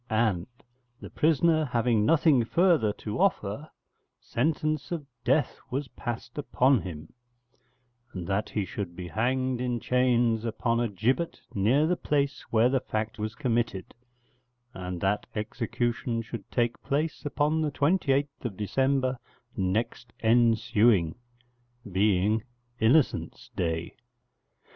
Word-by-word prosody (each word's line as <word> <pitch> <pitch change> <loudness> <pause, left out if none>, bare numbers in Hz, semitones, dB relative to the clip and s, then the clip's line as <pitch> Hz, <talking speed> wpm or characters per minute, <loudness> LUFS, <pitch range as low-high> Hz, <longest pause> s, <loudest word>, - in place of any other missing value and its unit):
And, 110 -6 +1 0.5
the - - -10
prisoner 160 +1 +3
having 120 -5 +1
nothing 155 -6 +4
further 165 - +3
to 105 +4 -5
offer, 155 - 0 0.5
sentence 155 +3 -1
of 165 -4 -3 0.2
death 135 +5 +1
was 135 +1 -3
passed 120 +5 -6
upon 130 -4 +3
him, 80 -3 -8 1.0
and 90 -3 -6
that 100 +3 -1
he 105 - -1
should 90 -1 -5
be 90 -1 -7
hanged 130 +3 0
in 125 -1 -1
chains 120 -2 +2
upon 115 0 0
a 120 - +1
gibbet 125 - -1
near 120 +10 +3
the 180 +3 +2
place 140 -3 0
where 115 +1 +4
the 130 +1 +2
fact 110 -2 -4
was 110 +1 -3
committed, 115 -7 -1 0.8
and 90 -1 -5
that 100 +2 0
execution 115 +1 -2
should 110 -3 -8
take 120 -1 0
place 150 +3 -2
upon 150 +2 +1
the 155 - +1
28th 140 - 0
December 130 +4 0 0.4
next 110 +5 -2
ensuing, 110 -5 +4 0.8
being 100 +3 +2 0.4
Innocents' 130 +6 +2
Day. 80 -1 -2
120 Hz, 120 wpm, -28 LUFS, 105-140 Hz, 1.0 s, nothing